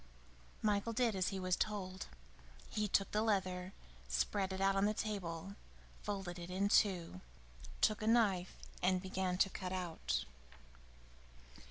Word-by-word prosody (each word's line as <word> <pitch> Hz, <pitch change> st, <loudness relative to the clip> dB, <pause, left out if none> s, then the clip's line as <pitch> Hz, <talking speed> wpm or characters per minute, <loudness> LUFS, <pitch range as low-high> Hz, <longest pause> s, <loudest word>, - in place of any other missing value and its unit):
Michael 210 Hz, +1 st, +2 dB
did 230 Hz, -2 st, +2 dB
as 185 Hz, -1 st, +1 dB
he 195 Hz, -, -2 dB
was 185 Hz, -1 st, +1 dB
told. 190 Hz, -3 st, -2 dB, 0.6 s
He 210 Hz, 0 st, 0 dB
took 195 Hz, 0 st, +2 dB
the 210 Hz, -, +2 dB
leather, 185 Hz, -4 st, 0 dB, 0.4 s
spread 65 Hz, -, 0 dB
it 190 Hz, -, -3 dB
out 195 Hz, 0 st, +3 dB
on 195 Hz, +1 st, +3 dB
the 210 Hz, +1 st, +1 dB
table, 195 Hz, -4 st, -3 dB, 0.5 s
folded 195 Hz, -4 st, -4 dB
it 170 Hz, 0 st, -7 dB
in 195 Hz, +2 st, +1 dB
two, 175 Hz, -, +3 dB, 0.6 s
took 215 Hz, 0 st, +3 dB
a 215 Hz, -, -1 dB
knife 205 Hz, -6 st, +3 dB, 0.3 s
and 185 Hz, +1 st, +3 dB
began 185 Hz, -1 st, -1 dB
to 195 Hz, -, +4 dB
cut 185 Hz, -1 st, -4 dB
out. 160 Hz, -, -2 dB
190 Hz, 145 wpm, -37 LUFS, 180-205 Hz, 0.6 s, to